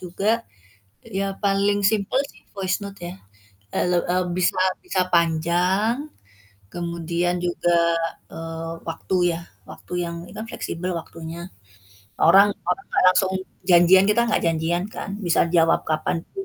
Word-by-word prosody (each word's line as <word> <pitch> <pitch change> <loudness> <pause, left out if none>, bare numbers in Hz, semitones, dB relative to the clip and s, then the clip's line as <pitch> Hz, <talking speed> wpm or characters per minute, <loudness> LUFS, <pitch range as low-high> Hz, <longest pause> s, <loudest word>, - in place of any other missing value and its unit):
juga, 185 +3 -3 0.8
ya 195 -3 -3
paling 200 +1 +2
simpel 210 +5 +2
sih, - - -23
voice 190 0 -1
note, 200 -1 -8
ya, 175 +1 -5 0.6
eee, - - +2
le 175 - +3
eee, 180 0 +1
bisa 185 - +1 0.2
bisa 345 - -1
panjang 180 - +2 0.6
kemudian 170 +1 -2
juga, 175 0 +1 0.6
eee, 165 0 -6 0.2
waktu, 175 +3 -2 0.2
ya - - -8 0.3
waktu - - -10
yang 170 -1 -4
ini - - -13
kan 220 - -5
fleksibel 185 -6 -4
waktunya. 165 +2 -8 0.7
Orang 195 +5 +6 0.2
orang 180 - 0
nggak - - +2
langsung 190 0 +2 0.4
janjian, 180 +2 +7
kita 210 +3 +3
nggak 215 - +2
janjian, 165 +2 0
kan, 210 - -7
bisa 175 -3 +2
jawab 165 -1 +3
kapan 155 +1 -1
pun 390 -1 -5
180 Hz, 140 wpm, -23 LUFS, 170-195 Hz, 0.8 s, janjian